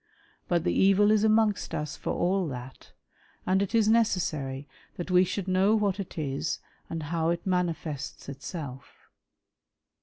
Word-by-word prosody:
But 170 -2 +1
the 175 - +1
evil 195 +2 +5
is 215 -1 +3
amongst 215 -5 +2
us 150 -2 -3
for - - -4
all 185 0 +1
that, 130 -1 -8 0.5
and 190 +1 +2
it 200 +3 -1
is 220 -2 +4
necessary 155 -11 +1 0.3
that 175 +1 -4
we 180 0 +6
should 190 +1 -3
know 190 +3 +3
what 205 -2 +1
it 195 - -6
is 140 0 -2 0.3
and 165 -1 -4
how 165 +2 0
it 170 0 -2
manifests 165 -6 -2
itself. 140 -1 -8
175 Hz, 150 wpm, -28 LUFS, 150-195 Hz, 0.5 s, we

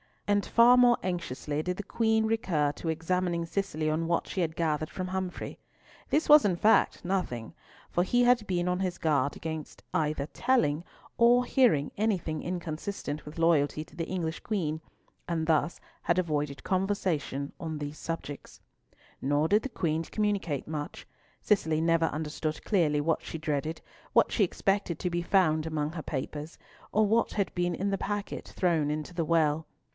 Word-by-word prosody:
And 205 0 +2
far 240 +2 +6
more 245 -1 +6
anxiously 155 -5 -2
did 180 +3 -2
the 205 - -4
Queen 220 +1 +1
recur 185 -10 +1
to 165 - -8
examining 170 +1 0
Cicely 165 -4 -2
on 160 +2 0
what 170 0 0
she - - -4
had 160 -2 -1
gathered 155 -2 0
from 185 -1 -4
Humfrey. 185 -1 -4 0.5
This 310 - +2
was 300 0 +9
in 190 -4 +2
fact 215 +6 +3
nothing, 175 -12 -2 0.4
for 175 - +2
he 245 +7 +3
had 245 -3 +4
been 175 -1 0
on 180 0 0
his 185 -2 -1
guard 145 -4 +1
against 160 -2 -6
either 150 -2 0
telling 175 - +1 0.3
or 240 +1 +6
hearing 230 - +3
anything 190 -7 0
inconsistent 165 -2 -4
with 150 +2 -10
loyalty 155 -2 +2
to - - -19
the 165 -1 -3
English 170 -3 -3
Queen, 160 -8 -2 0.5
and 165 -2 -1
thus 160 +1 +1 0.2
had 170 - +2
avoided 150 -5 -1
conversation 185 -8 -1
on 160 -3 -4
these 145 0 -5
subjects. 165 -3 -6 0.6
Nor 145 +3 +1
did 210 +2 +4
the 270 - -3
Queen 165 -8 -1
communicate 195 -7 -1
much. 150 -1 -5 0.4
Cicely 160 -7 +2
never 165 0 +3
understood 155 0 -3
clearly 155 -8 +2
what 160 +2 +1
she - - -6
dreaded, 155 0 -2 0.3
what - - +4
she 210 - +3
expected 195 -2 -1
to 180 - -2
be 175 0 0
found 165 -4 +2
among 155 -1 -1
her 160 -1 -5
papers, 150 +2 -5 0.3
or 215 +1 +3
what 225 +3 +2
had 200 -3 -1
been 175 -1 0
in 200 +4 -1
the 195 - -1
packet 205 0 -4
thrown 165 -5 +2
into 155 +3 -3
the 165 -2 -1
well. 160 -1 +2
165 Hz, 170 wpm, -29 LUFS, 155-195 Hz, 0.6 s, was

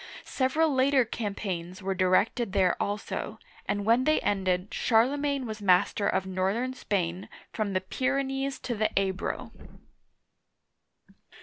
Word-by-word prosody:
Several 290 +4 +1
later 265 -1 +3
campaigns 195 -5 -4
were 195 0 0
directed 190 +4 +1
there 185 -3 +3
also, 210 +1 -3 0.3
and 200 0 -1
when 235 +4 +3
they 310 0 +3
ended, 190 -1 0
Charlemagne 275 +4 +2
was 215 -2 -6
master 195 +1 +3
of 190 - 0
northern 190 +7 -1
Spain, 185 -6 -2 0.2
from 210 -3 -2
the 185 - +1
Pyrenees 270 +5 -1
to 245 - -3
the 215 -1 +1
Ebro. 190 -1 -3
210 Hz, 120 wpm, -28 LUFS, 190-260 Hz, 0.3 s, later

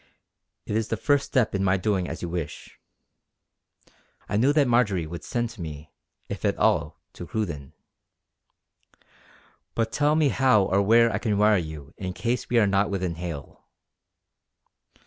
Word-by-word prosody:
"It 105 - -3
is 110 -1 0
the 115 - -2
first 145 +4 +1
step 125 -4 +1
in 95 -1 0
my 95 0 +3
doing 95 -1 -1
as - - -6
you 85 - -3
wish." 85 -4 -6 1.5
I - - -2
knew 125 +7 +4
that 145 -2 +3
Marjory 105 -8 +2
would 85 +2 -7
send 120 -1 -2
to 115 - -11
me, 75 -2 -8 0.4
if - - -6
at - - +1
all, - - +1
to 85 - -9
Cruden. 85 - -4 2.0
"But 115 -1 0
tell 150 +1 +2
me 155 -3 +3
how 130 -6 +4
or 95 +1 +2
where 115 +2 +4
I 95 - -1
can 110 -3 0
wire 105 0 +4
you 80 -4 -6
in 95 -1 -4
case 120 +5 -2
we 120 - +2
are 110 - +5
not 100 0 +2
within 95 -3 -2
hail." 80 -5 -7
100 Hz, 165 wpm, -25 LUFS, 90-115 Hz, 2.0 s, are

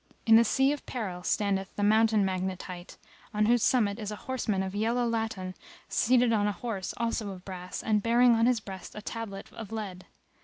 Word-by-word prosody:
In 225 - +7
the 230 - +8
Sea 270 +4 +3
of 295 - -4
Peril 195 -8 -4
standeth 195 0 -1
the 205 - -1
Mountain 215 0 +4
Magnet 185 -1 -2
hight; 180 -1 -9 0.4
on 210 0 +3
whose 240 +1 +4
summit 215 -4 +2
is 210 -2 -4
a 210 - -4
horseman 220 -7 -1
of 190 0 -4
yellow 230 +4 +1
laton 220 -5 -2 0.4
seated 245 0 +3
on 205 -2 +2
a - - +1
horse 200 -2 -4
also 230 -2 -1
of 185 -2 -9
brass 180 -1 -6
and 215 -1 +2
bearing 240 +2 +5
on 230 +1 +3
his 250 -2 +3
breast 195 -3 -9
a 210 - -7
tablet 210 -4 -6
of 220 -2 -8
lead. 200 -5 -6
210 Hz, 200 wpm, -29 LUFS, 190-230 Hz, 0.4 s, the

